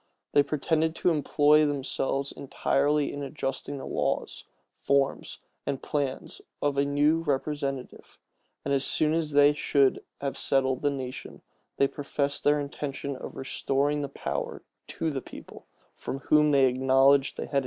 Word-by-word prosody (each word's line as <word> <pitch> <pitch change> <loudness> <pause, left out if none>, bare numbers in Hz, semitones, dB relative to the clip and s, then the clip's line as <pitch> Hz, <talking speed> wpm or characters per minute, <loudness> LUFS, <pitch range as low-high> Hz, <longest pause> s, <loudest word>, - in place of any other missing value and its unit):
[*] - - -56
They 145 - +6
pretended 155 +3 0
to 180 - +2
employ 150 0 +4
themselves 140 -1 -1
entirely 145 +2 0
in 145 - -5
adjusting 140 0 -4
the 135 - -7
laws, - - -2 0.3
forms, 140 0 0 0.3
and 135 - -3
plan 140 -3 -2 0.3
of 145 -1 0
a 140 - +3
new 145 +3 +2
representative; 140 -3 -3 0.5
and 140 - 0
as 135 -1 +1
soon 155 +2 +1
as 160 -2 -1
they 145 +1 +6
should 140 -2 +2 0.2
have 140 -1 -4
settled 130 -2 +1
the 145 - +2
nation, 130 -2 -6 0.3
they 140 - +4
professed 140 0 -3
their 145 0 +3
intention 140 -1 -4
of - - -8
restoring 140 +2 -1
the 140 - -4
power - - -4 0.2
to 160 - -2
the 135 -2 -3
people, - - -12 0.3
from 135 - -5
whom 150 +2 +3
they 140 -2 +5
acknowledged 135 +2 +3
they - - -3
had - - -8
entirely - - -18
derived - - -16
it. 140 - +4
140 Hz, 165 wpm, -27 LUFS, 135-150 Hz, 0.5 s, They